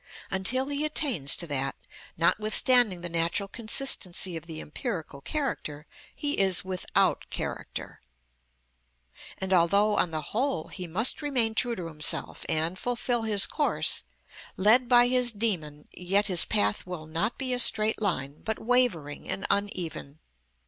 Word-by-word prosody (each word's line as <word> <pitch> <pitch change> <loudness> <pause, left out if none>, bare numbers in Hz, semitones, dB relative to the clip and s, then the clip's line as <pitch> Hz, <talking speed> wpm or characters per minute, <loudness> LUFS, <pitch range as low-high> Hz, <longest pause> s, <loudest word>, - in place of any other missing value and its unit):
Until 255 +9 +2
he 285 +1 -1
attains 270 - +3
to 170 - -4
that, 135 -3 -3 0.4
notwithstanding 215 - +3
the 175 - -2
natural 170 +4 0
consistency 205 -5 +3
of 165 +1 -8
the 160 -2 -7
empirical 160 - -6
character, 155 - -4 0.3
he 290 0 0
is 190 -2 +3
without 185 -1 -1
character. - - -6 1.4
And 190 0 -2
although, 200 +5 +2
on 175 - +1
the 155 -1 -4
whole, 245 - -2
he 180 -2 -7
must 215 - +1
remain 250 -7 +1
true 240 +1 -1
to 180 - -7
himself, 155 -2 -3
and 165 +3 -1
fulfil 245 0 -1
his 215 -3 +2
course, 295 -1 0 0.5
led 230 +6 +4
by 245 -1 +5
his 250 -1 +1
dæmon, 170 -9 -3
yet 195 +3 0
his 185 -4 +3
path 105 - 0
will 180 -4 -7
not 170 +9 -3
be 260 -2 +1
a 250 - -1
straight 220 -2 +3
line, 145 -8 -3
but 220 -1 -3
wavering 220 - 0
and 195 - -4
uneven. 175 -8 -4
195 Hz, 140 wpm, -26 LUFS, 165-240 Hz, 1.4 s, by